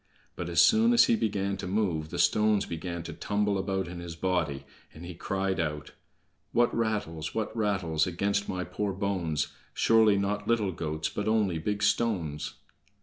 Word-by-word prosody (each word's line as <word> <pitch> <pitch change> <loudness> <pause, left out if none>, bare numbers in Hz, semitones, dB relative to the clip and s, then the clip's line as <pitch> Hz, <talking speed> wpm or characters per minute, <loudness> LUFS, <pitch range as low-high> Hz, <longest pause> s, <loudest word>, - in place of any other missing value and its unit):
But - - -4
as - - +1
soon 230 +1 +6
as 235 - +7
he 240 - +3
began 100 - -1
to - - -5
move, 90 -6 -1
the - - -5
stones 105 -1 +3
began 85 0 -5
to - - -7
tumble 105 -1 0
about 95 -1 -1
in 90 0 -7
his 85 -1 -7
body, 85 -6 -1 0.3
and 80 +2 -9
he 90 - -7
cried 95 +2 -2
out: 75 -2 -3 0.6
"What 120 0 +3
rattles, 105 -9 -2
what 110 0 -2
rattles 95 -8 +1
Against 100 +3 -1
my 90 -1 -2
poor 100 +1 -3
bones? 95 -6 -1 0.3
Surely 110 -3 +5
not 105 +1 -1
little 110 -5 +2
goats, 80 -2 -3
But 105 - -4
only 105 -6 +2
big 100 +5 -2
stones!" 90 -10 0
95 Hz, 170 wpm, -28 LUFS, 85-105 Hz, 0.6 s, as